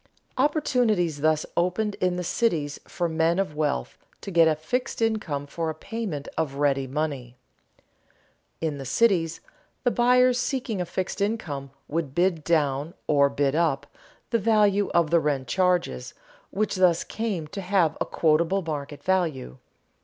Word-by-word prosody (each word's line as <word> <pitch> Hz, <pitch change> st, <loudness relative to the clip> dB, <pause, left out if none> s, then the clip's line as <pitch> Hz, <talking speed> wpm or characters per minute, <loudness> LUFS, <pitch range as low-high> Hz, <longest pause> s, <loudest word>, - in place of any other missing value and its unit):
Opportunities 245 Hz, -, +1 dB
thus 155 Hz, 0 st, +2 dB
opened 185 Hz, +5 st, 0 dB
in 180 Hz, -1 st, +2 dB
the 180 Hz, -, -3 dB
cities 165 Hz, -8 st, 0 dB
for 175 Hz, -, -2 dB
men 165 Hz, +1 st, +1 dB
of 190 Hz, -6 st, -1 dB
wealth 150 Hz, -, -2 dB, 0.2 s
to 200 Hz, -, -6 dB
get 165 Hz, -2 st, +5 dB
a 155 Hz, -, +3 dB
fixed 160 Hz, +12 st, -3 dB
income 215 Hz, -11 st, -1 dB
for 160 Hz, +3 st, -3 dB
a 160 Hz, -, -4 dB
payment 205 Hz, -11 st, -5 dB
of 150 Hz, -4 st, -1 dB
ready 140 Hz, -2 st, +1 dB
money. 135 Hz, -4 st, -3 dB, 1.2 s
In 155 Hz, -3 st, -2 dB
the 135 Hz, -, -6 dB
cities, 170 Hz, -, +2 dB, 0.4 s
the 245 Hz, -, +3 dB
buyers 250 Hz, +1 st, +4 dB
seeking 250 Hz, -5 st, -2 dB
a 175 Hz, -, -3 dB
fixed 185 Hz, +3 st, -3 dB
income 160 Hz, -10 st, -2 dB, 0.2 s
would 150 Hz, -3 st, -3 dB
bid 175 Hz, -3 st, +1 dB
down, 150 Hz, -1 st, 0 dB
or 140 Hz, -1 st, +4 dB
bid 140 Hz, -1 st, 0 dB
up, 155 Hz, -4 st, +1 dB, 0.5 s
the 230 Hz, -, +2 dB
value 205 Hz, -2 st, +3 dB
of 170 Hz, -3 st, +2 dB
the 170 Hz, -, +5 dB
rent 140 Hz, -4 st, -1 dB
charges, 180 Hz, -, 0 dB, 0.3 s
which 210 Hz, 0 st, -1 dB
thus 180 Hz, -3 st, +4 dB
came 210 Hz, -8 st, -3 dB
to 195 Hz, -, -5 dB
have 180 Hz, -4 st, +2 dB
a -, -, +2 dB
quotable 165 Hz, +4 st, +2 dB
market 145 Hz, -2 st, -5 dB
value. 160 Hz, -, -1 dB
170 Hz, 155 wpm, -25 LUFS, 145-200 Hz, 1.2 s, get